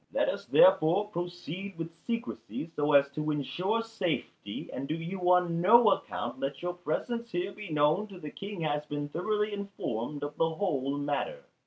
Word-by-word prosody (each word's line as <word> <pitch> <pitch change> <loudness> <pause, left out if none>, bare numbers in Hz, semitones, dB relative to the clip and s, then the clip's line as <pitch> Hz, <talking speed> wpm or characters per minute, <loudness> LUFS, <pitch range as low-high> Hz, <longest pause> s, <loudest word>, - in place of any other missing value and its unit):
Let - - +2
us - - -4
therefore 205 - +5
proceed 175 0 -5
with 165 0 -5
secrecy, 230 -8 -4
so 145 0 +1
as 140 0 +7
to 150 +2 -2
ensure 160 - 0
safety, 180 - -3
and 135 - -4
do 155 - -1
you 180 +2 0
on 175 -2 +3
no 225 +4 +7
account - - -2
let 135 +1 -2
your 175 0 -1
presence 230 +8 -3
here 180 +3 -1
be 205 -1 -9
known 150 +7 +3
till 195 -3 -11
the 150 -3 -7
King 200 -2 -6
has 150 -1 0
been 145 0 -3
thoroughly 210 +6 0
informed 150 - -4
of 145 0 -4
the 165 - +3
whole 140 -7 0
matter." 145 - -2
175 Hz, 175 wpm, -30 LUFS, 150-200 Hz, -, as